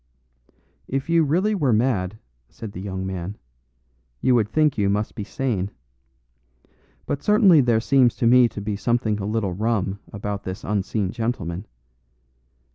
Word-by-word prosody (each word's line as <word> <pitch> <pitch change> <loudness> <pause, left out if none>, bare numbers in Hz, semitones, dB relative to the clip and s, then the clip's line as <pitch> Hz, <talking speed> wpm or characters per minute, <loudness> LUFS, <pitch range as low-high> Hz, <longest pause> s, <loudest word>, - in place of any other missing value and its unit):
"If 135 +4 -2
you 165 -1 +5
really 180 +9 +1
were 150 -11 +1
mad," 110 -4 +1 0.3
said 110 -3 -8
the 90 - -8
young 95 -1 -4
man, 95 +1 -5 0.8
"you 130 - +3
would 110 -4 +2
think 155 +2 +2
you 100 -2 +1
must 105 +2 -1
be 105 - -5
sane. 105 -5 -2 1.4
But 140 - -3
certainly 200 -7 +5
there 120 -3 +3
seems 125 0 +3
to 125 - -1
me 120 0 +6
to 105 - -7
be 100 0 -2
something 110 -1 0
a 100 - -3
little 105 -4 -1
rum 100 -1 -1
about 100 0 -4
this 95 +1 -6
unseen 100 -1 -1
gentleman. 110 -6 -3
110 Hz, 150 wpm, -23 LUFS, 100-130 Hz, 1.4 s, me